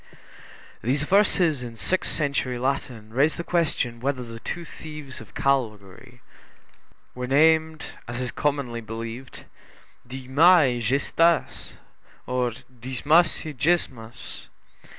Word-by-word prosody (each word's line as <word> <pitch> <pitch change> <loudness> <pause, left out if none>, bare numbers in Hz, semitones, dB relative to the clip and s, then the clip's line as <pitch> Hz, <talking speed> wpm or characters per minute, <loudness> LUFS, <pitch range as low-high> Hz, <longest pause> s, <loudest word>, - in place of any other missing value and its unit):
15 - - -23 0.6
These 135 +6 0
verses 180 -5 +3
in 120 -2 -7
sixth 185 +11 0
century 140 -4 -1
Latin 125 -4 -3
raise 145 +5 +2
the 170 - -3
question 150 -9 0
whether 130 0 -2
the 115 -1 -9
two 170 +8 -5
thieves 150 -5 -9
of - - -15
Calvary 120 -2 -2 0.9
were 125 0 -5
named, 160 +3 +3 0.2
as 120 0 -5
is 125 -1 -2
commonly 140 -6 -1
believed, 115 +3 -7 0.6
Dismas 135 +7 +4
and 120 -1 -3
Gestas, 145 +7 +1 0.5
or 125 -1 0 0.3
Dismas 145 +9 +2
and 150 -5 -7
Gesmas. 125 -8 -2
130 Hz, 115 wpm, -25 LUFS, 120-155 Hz, 0.9 s, Dismas